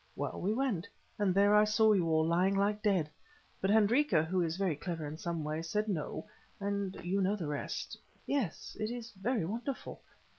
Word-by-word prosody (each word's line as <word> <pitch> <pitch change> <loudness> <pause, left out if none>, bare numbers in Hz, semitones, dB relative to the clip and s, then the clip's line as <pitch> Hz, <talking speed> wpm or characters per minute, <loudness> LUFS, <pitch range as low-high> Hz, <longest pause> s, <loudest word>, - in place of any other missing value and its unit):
Well, - - -3
we 195 - +1
went; 225 -7 0 0.3
and 205 -2 +3
there 200 +2 +4
I 210 0 +7
saw 215 0 +4
you 175 -5 +2
all 160 0 +3
lying 180 +4 +2
like 205 +2 +1
dead; 195 -7 +2 0.5
but 195 - +1
Hendrika, 220 - +4
who 180 +3 0
is 165 0 -1
very 190 -5 +1
clever 165 0 -4
in 145 +1 -5
some 170 -2 -3
ways, 155 +2 -3
said 210 +3 0
no—and 200 +3 -4
you 195 +3 +1
know 195 +2 +2
the 180 -6 -4
rest. 145 -1 -4 0.3
Yes, 260 - -2
it 215 0 -1
is 235 -1 -6
very 210 0 -1
wonderful." 235 +8 -5
195 Hz, 185 wpm, -33 LUFS, 170-215 Hz, 0.5 s, I